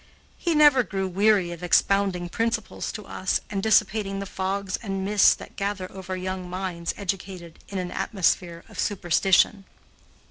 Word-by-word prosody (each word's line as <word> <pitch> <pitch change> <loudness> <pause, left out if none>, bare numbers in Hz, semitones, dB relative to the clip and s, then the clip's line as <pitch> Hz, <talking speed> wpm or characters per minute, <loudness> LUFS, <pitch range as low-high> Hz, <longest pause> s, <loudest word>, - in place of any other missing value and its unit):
He 340 -2 0
never 295 -4 +6
grew 195 -5 -3
weary 195 -1 +2
of 170 0 -8
expounding 180 0 +2
principles 225 +3 -2
to 210 -2 -7
us 185 - -1
and 195 -2 -1
dissipating 210 -1 +2
the 195 - -4
fogs 190 0 -2
and 195 -3 -3
mists 205 0 +5
that - - -12
gather 195 -2 -3
over 190 -1 -6
young 185 0 -4
minds 180 -2 -4
educated 185 -3 -5
in 200 - -5
an 180 -1 -3
atmosphere 175 -4 -1
of - - -11
superstition. 195 +1 +2
195 Hz, 150 wpm, -25 LUFS, 180-205 Hz, -, never